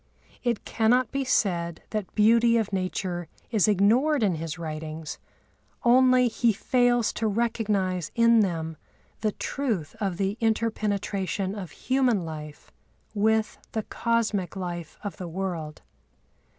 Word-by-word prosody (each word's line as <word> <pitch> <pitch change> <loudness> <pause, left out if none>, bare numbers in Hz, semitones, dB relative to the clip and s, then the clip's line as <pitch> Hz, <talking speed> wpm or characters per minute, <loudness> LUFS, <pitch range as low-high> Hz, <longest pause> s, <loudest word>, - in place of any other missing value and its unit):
It 240 -3 -1
cannot 240 +3 +2
be 275 0 -1
said 170 -9 0
that 210 -4 -4
beauty 230 +2 +5
of 215 -3 -1
nature 185 -2 -2 0.2
is 215 -3 +3
ignored 230 +8 +3
in 195 -4 +3
his 160 0 -4
writings; 155 -1 -6 0.6
only 255 +1 +5
he 230 0 +2
fails 245 0 +2
to 220 - -1
recognise 205 -6 0
in 230 0 +5
them 165 -5 -1 0.4
the 215 -2 0
truth 220 - -3
of 195 -4 -1
the 195 +2 -1
inter 225 0 +1
penetration 200 -2 -2
of 195 -5 -6
human 250 - +1
life 150 -2 -8 0.4
with 220 +1 +1
the 220 - -1
cosmic 225 -6 -1
life 175 -4 -5
of 205 - -5
the 180 - -6
world. 165 -3 -4
205 Hz, 130 wpm, -26 LUFS, 175-230 Hz, 0.6 s, beauty